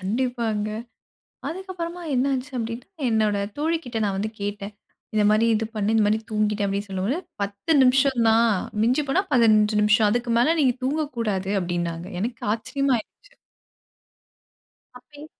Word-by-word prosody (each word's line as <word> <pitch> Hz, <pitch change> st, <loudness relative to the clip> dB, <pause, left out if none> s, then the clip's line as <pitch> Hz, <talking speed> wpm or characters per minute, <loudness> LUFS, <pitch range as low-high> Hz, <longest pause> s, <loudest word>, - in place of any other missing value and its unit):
கண்டிப்பாங்க. 225 Hz, 0 st, -1 dB, 0.8 s
அதுக்கு 375 Hz, +3 st, -7 dB
அப்பறமா 345 Hz, 0 st, -5 dB
என்ன 255 Hz, +2 st, +2 dB
ஆச்சு 260 Hz, +3 st, -4 dB
அப்பிடின்னா, 230 Hz, +1 st, -4 dB, 0.2 s
என்னோட 215 Hz, -2 st, +2 dB, 0.2 s
தோழிக்கிட்ட 305 Hz, -7 st, -1 dB
நான் 195 Hz, -1 st, -1 dB
வந்து 215 Hz, +2 st, -2 dB
கேட்டேன். 205 Hz, 0 st, -4 dB, 0.4 s
"இந்தமாரி 215 Hz, +2 st, +3 dB
இது 220 Hz, 0 st, 0 dB
பண்ணேன் 215 Hz, +1 st, 0 dB
இந்தமாரி 215 Hz, 0 st, +3 dB
தூங்கிட்டேன்" 210 Hz, -1 st, +1 dB
அப்பிடின்னு 200 Hz, +1 st, -3 dB
சொல்லும்போது, 195 Hz, -, -1 dB, 0.2 s
10 200 Hz, +10 st, -2 dB
நிமிஷம் 260 Hz, -1 st, +3 dB
தான் 230 Hz, +1 st, +4 dB, 0.3 s
மிஞ்சி 255 Hz, +6 st, +2 dB
போனா 365 Hz, +8 st, +2 dB
15 215 Hz, -3 st, +4 dB
நிமிஷம். 215 Hz, 0 st, +4 dB
அதுக்கு 240 Hz, +1 st, 0 dB
மேல 315 Hz, +7 st, +3 dB
நீங்க 255 Hz, -4 st, +3 dB
தூங்கக்கூடாது"அப்பிடினாங்க. 195 Hz, -, -2 dB
எனக்கு 230 Hz, +2 st, -4 dB
ஆச்சரியமா 275 Hz, +3 st, -1 dB
ஆயிருச்சு. 410 Hz, -, -14 dB, 1.6 s
அப்பயே 290 Hz, +4 st, -14 dB
225 Hz, 130 wpm, -24 LUFS, 210-260 Hz, 1.6 s, தான்